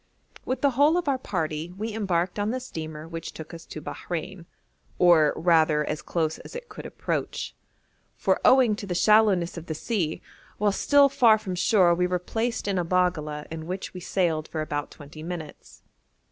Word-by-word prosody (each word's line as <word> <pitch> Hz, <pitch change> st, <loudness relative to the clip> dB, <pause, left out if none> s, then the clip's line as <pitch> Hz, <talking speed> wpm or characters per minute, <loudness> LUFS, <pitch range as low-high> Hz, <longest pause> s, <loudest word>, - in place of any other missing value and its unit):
With 255 Hz, 0 st, -2 dB
the 280 Hz, -, +3 dB
whole 290 Hz, +6 st, +4 dB
of 355 Hz, -, -2 dB
our 270 Hz, -2 st, +1 dB
party 165 Hz, -5 st, -3 dB
we 220 Hz, +2 st, -4 dB
embarked 185 Hz, -3 st, -1 dB
on 205 Hz, +1 st, 0 dB
the 255 Hz, +3 st, -1 dB
steamer 160 Hz, -10 st, -7 dB
which 165 Hz, 0 st, -6 dB
took 160 Hz, +1 st, -9 dB
us 165 Hz, 0 st, -9 dB
to -, -, -7 dB
Bahrein, 175 Hz, +1 st, -6 dB, 0.5 s
or 170 Hz, -4 st, +5 dB
rather 160 Hz, -3 st, +3 dB
as 150 Hz, +1 st, -3 dB
close 160 Hz, -2 st, -2 dB
as -, -, -11 dB
it 485 Hz, 0 st, -7 dB
could -, -, -8 dB
approach; -, -, -3 dB, 0.6 s
for, -, -, +1 dB
owing 255 Hz, -5 st, +5 dB
to 205 Hz, -, -7 dB
the 180 Hz, -, -2 dB
shallowness 200 Hz, -4 st, +4 dB
of 170 Hz, -, -8 dB
the 160 Hz, -, -3 dB
sea, 170 Hz, -4 st, -2 dB, 0.4 s
while 210 Hz, 0 st, +2 dB
still 285 Hz, +7 st, +5 dB
far 245 Hz, -5 st, +5 dB
from 205 Hz, -4 st, -5 dB
shore 180 Hz, -1 st, +4 dB
we 180 Hz, +1 st, +1 dB
were 180 Hz, 0 st, 0 dB
placed 225 Hz, +6 st, -3 dB
in 195 Hz, -2 st, +1 dB
a -, -, +1 dB
baggala 165 Hz, -4 st, 0 dB
in 160 Hz, 0 st, -6 dB
which 185 Hz, +2 st, -5 dB
we 185 Hz, -, -7 dB
sailed 170 Hz, -4 st, 0 dB
for 155 Hz, -, -4 dB
about 145 Hz, -1 st, -3 dB
twenty 150 Hz, +1 st, -12 dB
minutes. 160 Hz, -2 st, -8 dB
180 Hz, 190 wpm, -26 LUFS, 160-215 Hz, 0.6 s, or